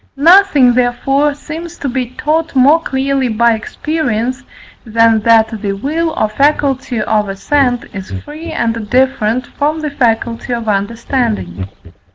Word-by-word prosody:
Nothing 305 -5 +5
therefore 270 +4 +1
seems 320 +3 -8
to 285 - -4
be 255 -1 -2
taught 305 +4 -2
more 285 +5 +5
clearly 270 -2 -1
by 235 +1 +2
experience, 255 0 -2 0.4
than 225 0 +3
that 220 -1 +2
the 200 -2 -2
will 305 +11 -2
or 215 - +2
faculty 270 0 0
of 210 -1 0
assent 245 +5 0
is 190 -2 -7
free 315 +3 -8
and 230 -7 -2
different 255 -2 +1
from 300 +4 -2
the 300 -1 -3
faculty 235 -2 -1
of 230 -1 -6
understanding. 210 - -2
250 Hz, 135 wpm, -14 LUFS, 225-290 Hz, 0.4 s, Nothing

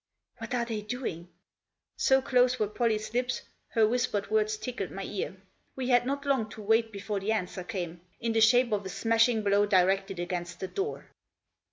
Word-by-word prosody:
" - - -49
What 250 - -4
are 240 -1 0
they 225 -3 -3
doing? 210 -7 -5 0.4
" - - -61 0.3
So 265 0 +3
close 255 -1 +3
were 215 - +1
Pollie's 215 0 -1
lips 250 +1 -1 0.2
her 225 -2 +3
whispered 215 -4 -1
words 215 0 +2
tickled 215 -3 -4
my 195 - -6
ear. 190 -1 -4 0.4
We 260 -1 -3
had 245 0 +4
not 280 +1 -2
long 265 -6 +1
to 215 - -9
wait 225 +2 +2
before 200 0 -3
the 200 +3 -1
answer 185 -3 -2
came 175 -4 -5
— - - -38
in 230 -1 -1
the 225 - +3
shape 245 +2 +5
of 205 -1 0
a 190 - -6
smashing 225 +2 +2
blow 205 0 +3
directed 195 0 +2
against 175 0 -4
the 190 - -3
door. 400 +2 -3
215 Hz, 200 wpm, -29 LUFS, 195-245 Hz, 0.4 s, shape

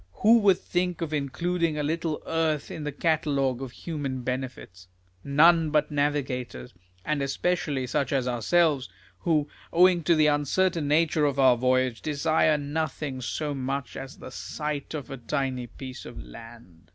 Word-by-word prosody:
Who 230 +2 +7
would 195 -4 +4
think 180 -1 -2
of 160 -2 -3
including 165 +3 -1
a 150 - -1
little 160 +1 -2
earth 160 -3 -1
in 155 - -6
the 150 - -2
catalogue 140 -4 0
of 135 -2 -5
human 140 -5 -5
benefits? 125 -8 -5 0.4
None 160 +3 +5
but 150 0 +1
navigators; 130 - -2 0.3
and 150 -2 0
especially 140 -1 -1
such 130 +2 -1
as 135 -3 +1
ourselves, 135 +4 +2 0.3
who, 155 -4 +1 0.2
owing 180 0 +5
to 170 - +4
the 155 -1 +4
uncertain 150 +3 +1
nature 155 0 +3
of 140 -2 0
our 130 -2 +6
voyage, 130 -1 +1
desire 155 +1 +2
nothing 145 -2 -3
so 145 +4 -3
much 135 -1 -3
as 135 0 -8
the - - -10
sight 150 +3 -4
of 145 -2 -6
a 135 - -5
tiny 130 0 -2
piece 130 +2 -9
of 120 - -10
land. 115 -8 -13
145 Hz, 155 wpm, -26 LUFS, 130-160 Hz, 0.4 s, Who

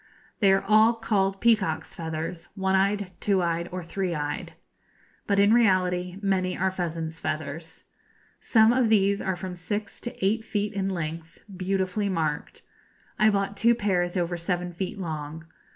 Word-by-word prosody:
They 200 -3 +5
are 195 - +3
all 215 +3 +5
called 195 -4 0
peacocks' 220 -9 +1
feathers, 165 +1 -5
one 190 -1 0
eyed, 200 0 +1
two 195 -3 +2
eyed, 170 0 -1
or 180 0 -4
three 180 +1 -2
eyed; 145 -1 -4 0.7
but, 200 - +2
in 200 +2 +5
reality, 185 -5 +2
many 185 -2 0
are 190 +1 +1
pheasants' 165 -3 -4
feathers. 155 +2 -5 0.6
Some 220 0 +4
of 245 -3 +2
these 200 -2 +3
are 190 - -1
from 180 0 -6
six 200 +4 -4
to 240 -5 -4
eight 220 +3 +1
feet 210 -1 -2
in 195 -1 -1
length, 165 -2 -5
beautifully 190 +2 -1
marked. 160 -5 -2 0.6
I 215 - +6
bought 200 -1 0
two 235 +4 +4
pairs 185 -4 0
over 175 0 -1
seven 175 +1 -2
feet 185 +3 -4
long. 160 -3 -5
190 Hz, 155 wpm, -26 LUFS, 170-200 Hz, 0.7 s, I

